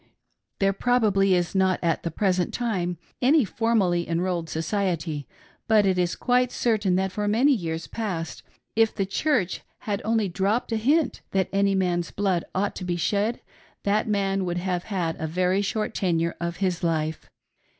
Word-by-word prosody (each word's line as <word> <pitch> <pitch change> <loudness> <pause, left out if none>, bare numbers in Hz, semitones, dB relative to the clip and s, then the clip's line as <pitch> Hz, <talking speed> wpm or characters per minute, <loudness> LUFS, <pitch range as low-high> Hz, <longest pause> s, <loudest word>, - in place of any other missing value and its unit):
There 195 0 +2
pro 245 +5 +2
bably 195 -3 +3
is 175 -1 +1
not 190 -1 +2
at 165 -1 +1
the 170 - -2
present 185 +1 0
time 185 -8 -1 0.2
any 275 +1 +5
formally 195 -6 +1
enrolled 170 -1 -1
society, 160 -3 -2 0.4
but 215 -2 +5
it 185 -1 +2
is 175 -1 +1
quite 250 0 +2
certain 210 -6 +1
that 190 0 0
for 210 +2 -2
many 240 +8 +4
years 165 -7 -3
past 185 -8 -4 0.3
if 225 0 +3
"The 195 - 0
Church" 200 - 0 0.2
had 205 -2 -2
only 220 -1 +1
dropped 200 +7 0
a 225 - +1
hint 280 +6 +1
that 190 -1 +1
any 200 0 +3
man's 175 -2 0
blood 190 -4 0
ought 200 +2 0
to - - -5
be 180 -1 -1
shed, 205 +6 0 0.4
that 205 +2 +1
man 195 -2 0
would 175 -1 -2
have 180 0 -2
had 175 -6 -2
a 160 - -2
very 180 +4 +1
short 215 +2 -2
tenure 170 -3 0
of 170 0 -3
his 180 -2 -1
life. 160 -2 -1
190 Hz, 170 wpm, -25 LUFS, 175-215 Hz, 0.4 s, any